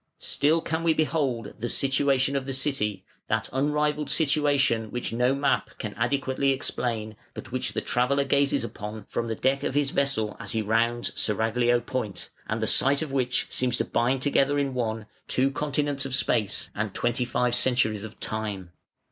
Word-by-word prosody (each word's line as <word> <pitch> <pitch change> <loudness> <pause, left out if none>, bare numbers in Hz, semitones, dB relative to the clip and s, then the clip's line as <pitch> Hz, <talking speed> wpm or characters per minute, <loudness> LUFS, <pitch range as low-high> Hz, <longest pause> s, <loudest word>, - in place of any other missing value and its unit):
Still 155 +3 +1
can 160 0 -2
we 165 -1 +2
behold 135 -9 0
"the 120 +2 -2
situation 135 0 +1
of 135 -1 -2
the 135 - -2
city", 115 -8 -1 0.2
that - - -1
unrivalled 150 +2 0
situation 140 -7 +2
which 125 0 -4
no 125 +3 +2
map 140 0 +1
can - - -5
adequately 140 0 0
explain, 115 -5 -2 0.2
but - - -8
which 130 0 -2
the - - -1
traveller 135 +3 +1
gazes 140 -1 +2
upon 105 -2 -6
from 115 - -3
the 115 - -2
deck 135 +4 +1
of 135 - -2
his 145 -1 +2
vessel 125 -7 0
as - - -3
he 110 - +1
rounds 115 +3 +1
Seraglio 115 +3 +1
Point, 120 -4 -4 0.2
and - - -2
the - - +3
sight 140 +3 +3
of 150 - -6
which 130 -2 +1
seems 125 -1 +1
to - - 0
bind 130 +2 +1
together 145 0 +2
in 140 -2 0
one, 115 -3 -2 0.2
two 135 +2 +2
continents 145 -1 -1
of 135 -1 0
space 105 -5 0
and 105 -2 -3
twenty 120 +1 0
five 125 0 0
centuries 120 -4 +2
of 110 -1 -9
time. 105 -5 -4
130 Hz, 175 wpm, -26 LUFS, 115-140 Hz, 0.2 s, the